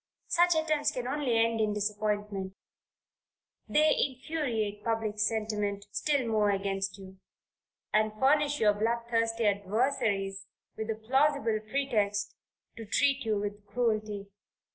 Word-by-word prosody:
Such 350 0 +4
attempts 310 -2 +1
can 250 -1 -4
only 265 -4 0
end 225 0 +2
in 210 -1 +1
disappointment; 205 -2 -2 1.1
they 305 0 +4
infuriate 250 -7 -2
public 225 -2 -1
sentiment 210 -2 -1
still 280 +1 0
more 215 -2 +2
against 195 0 -1
you, 190 -1 -12 0.7
and 215 0 +3
furnish 290 +2 +3
your 210 -2 +4
blood 230 +3 0
thirsty 230 0 +1
adversaries 200 -2 0 0.3
with 220 0 -5
a 225 - 0
plausible 255 0 +1
pretext, 210 -6 0 0.4
to 225 - -7
treat 275 +4 +2
you 215 -2 +1
with 205 0 -4
cruelty. 215 -2 -1
220 Hz, 120 wpm, -30 LUFS, 205-255 Hz, 1.1 s, Such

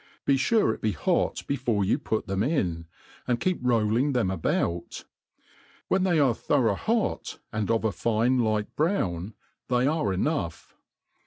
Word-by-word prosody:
Be 140 - +4
fure 135 - +2
it - - -10
be 110 -1 0
hot 75 - 0
before 120 -7 0
you - - +1
put 110 - -2
them 95 0 -2
in, 90 - -1 0.4
and 120 -2 +1
keep 185 +7 0
rolling 120 +3 +2
them 115 -7 +1
about. 85 -1 -2 0.8
When 190 0 +2
they 175 -3 +2
are 135 -5 +4
thorough 120 -3 +1
hot, 220 - -1 0.2
and 110 -2 -2
of 115 -1 +1
a 110 - +2
fine 115 +7 +1
light 110 -3 0
brown, 105 - -1 0.3
they 125 0 +2
are 150 -8 +1
enough. 95 - -2
115 Hz, 155 wpm, -26 LUFS, 100-140 Hz, 0.8 s, Be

